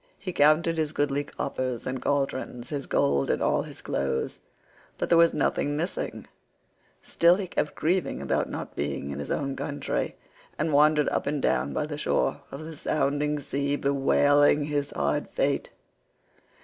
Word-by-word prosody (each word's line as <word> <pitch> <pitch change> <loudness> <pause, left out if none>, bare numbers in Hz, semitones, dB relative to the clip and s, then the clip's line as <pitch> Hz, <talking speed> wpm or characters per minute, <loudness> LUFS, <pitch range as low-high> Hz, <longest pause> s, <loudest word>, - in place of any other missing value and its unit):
He 185 -2 -5
counted 160 +2 +4
his 155 -1 -1
goodly 145 0 0
coppers 130 -4 -3
and 130 -1 -3
cauldrons, 130 -3 -2
his 140 -2 -4
gold 70 -1 +2
and - - +1
all - - +2
his - - -10
clothes, 70 -1 -2 0.6
but - - -2
there 170 - +5
was 170 0 +6
nothing 145 0 0
missing; 170 +4 -3 0.8
still 170 +1 +4
he 195 0 -3
kept 160 -4 -2
grieving 175 +3 0
about - - -1
not - - -6
being 70 -1 -3
in 70 - -5
his 70 - -5
own 135 -2 -1
country, 145 -1 -3 0.4
and 160 - 0
wandered 150 +1 +5
up - - -1
and 145 0 0
down 70 - +1
by 150 - -1
the 150 -1 -5
shore 145 - 0
of 140 +3 -8
the 160 0 -8
sounding 150 0 0
sea 140 0 -1
bewailing 145 +1 +3
his 145 -1 -1
hard 70 0 -1
fate. - - 0
145 Hz, 160 wpm, -27 LUFS, 130-155 Hz, 0.8 s, was